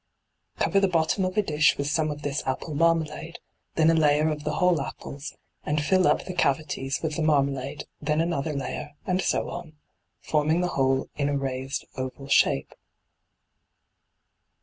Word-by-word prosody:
Cover 190 +4 +2
the 195 - +3
bottom 175 +2 +1
of 185 +3 -3
a 210 - +4
dish 150 -5 +3
with 140 - -1
some 155 +2 +1
of 150 0 -6
this 145 0 -1
apple 135 +4 -2
marmalade, 165 +1 0 0.4
then 160 0 +5
a - - +3
layer 155 -1 +3
of 150 -1 -4
the 150 - -1
whole 180 -5 +3
apples, 140 +1 -7 0.3
and 150 0 0
fill 185 +4 +3
up - - +2
the 185 - -5
cavities 140 -4 0
with 155 -2 -2
the - - -1
marmalade, 140 -2 +1 0.2
then 150 +1 0
another 165 -3 0
layer, 140 +1 -4
and 185 0 +1
so - - 0
on, 160 -2 -7 0.5
forming 155 +3 +1
the 180 - 0
whole 135 -2 +1
in 145 -1 +1
a 145 - 0
raised 135 0 -3
oval 130 +1 -5
shape. 70 - +3
150 Hz, 170 wpm, -26 LUFS, 140-165 Hz, 0.5 s, then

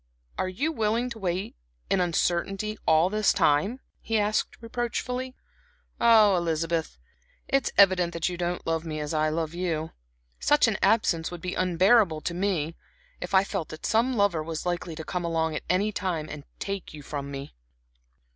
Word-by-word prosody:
"Are 185 - -1
you 280 - -1
willing 230 -1 0
to 230 - -7
wait 185 0 -2 0.3
in 190 - +2
uncertainty 180 +4 0
all 160 +4 +4
this 215 -1 +3
time?" 195 - +2 0.2
he 225 - -1
asked, 210 0 0
reproachfully. 250 +2 -3 0.6
"Ah, 220 -4 +6
Elizabeth, 165 - -1 0.5
it 275 -1 +1
is - - -4
evident 185 -3 +5
that 170 -1 -1
you 180 - -2
don't 175 0 -3
love 165 -1 0
me 155 -2 -4
as 150 +1 -3
I 155 0 +2
love 160 0 -2
you. 165 -3 -2 0.5
Such 295 -3 +4
an 215 -3 -1
absence 170 -7 +2
would 175 - -7
be 180 +1 -4
unbearable 185 -1 +3
to 170 - -3
me, 170 -4 -1 0.5
if 180 +2 -2
I 190 - +6
felt 195 -5 -4
that 155 - -8
some 235 +4 +2
lover 200 -6 +2
was 160 +1 -5
likely 175 -2 -2
to 160 - -6
come 180 +2 -3
along 160 -2 0
at - - -3
any 200 +4 +2
time 180 -7 -2
and 150 -1 -8
take 195 -5 -5
you 145 - -10
from 140 -1 -5
me." 140 0 -7
180 Hz, 175 wpm, -27 LUFS, 160-210 Hz, 0.6 s, Ah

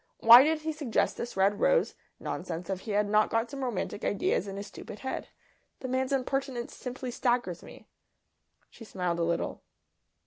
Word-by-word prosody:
Why 235 +3 +9
did 310 +1 +1
he 315 +1 -2
suggest 295 -7 0
this 235 -4 -6
red 200 +2 +2
rose - - +3 0.3
nonsense 175 +1 -5
if 190 - -2
he 210 - -6
had 205 0 +2
not 215 +1 +3
got 230 +2 -1
some 275 -1 -5
romantic 220 -4 -3
ideas 200 0 0
in 195 0 -6
his 200 - -5
stupid 210 - -10
head? 265 - -4 0.5
The 260 - -4
man's 260 +1 -1
impertinence 270 -2 -2
simply 250 0 -6
staggers 240 -8 0
me." - - -14 0.8
She - - -13
smiled 180 -5 -2
a - - +1
little. 170 0 -2
235 Hz, 175 wpm, -29 LUFS, 195-260 Hz, 0.8 s, Why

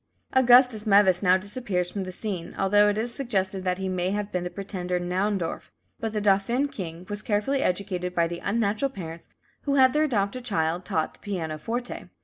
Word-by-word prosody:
Augustus 250 -3 +5
Meves 195 -3 +5
now 185 -2 +5
disappears 190 -3 -3
from 195 -1 -3
the 185 - -6
scene, 185 -3 -5
although 205 +2 +4
it 205 - -1
is 235 +2 0
suggested 195 -8 -1
that 180 -1 0
he 190 0 -3
may 185 -1 -1
have 205 +1 -2
been 180 -1 -1
the 180 - -3
pretender 180 -1 -3
Naundorff, 180 0 -2 0.3
but 225 - -2
the 215 - -1
"Dauphin 210 +7 +2
King" 175 -6 -7
was 205 0 -5
carefully 215 +7 0
educated 180 -2 -1
by 170 - +3
the 170 +1 -4
unnatural 220 +4 0
parents, 170 -9 -8 0.4
who 280 -1 +1
had 260 -2 +5
their 305 +1 +3
adopted 230 -2 -1
child 175 -5 -1
taught 160 -1 -1
the - - -22
pianoforte. 195 +5 -4
200 Hz, 185 wpm, -26 LUFS, 180-220 Hz, 0.4 s, Augustus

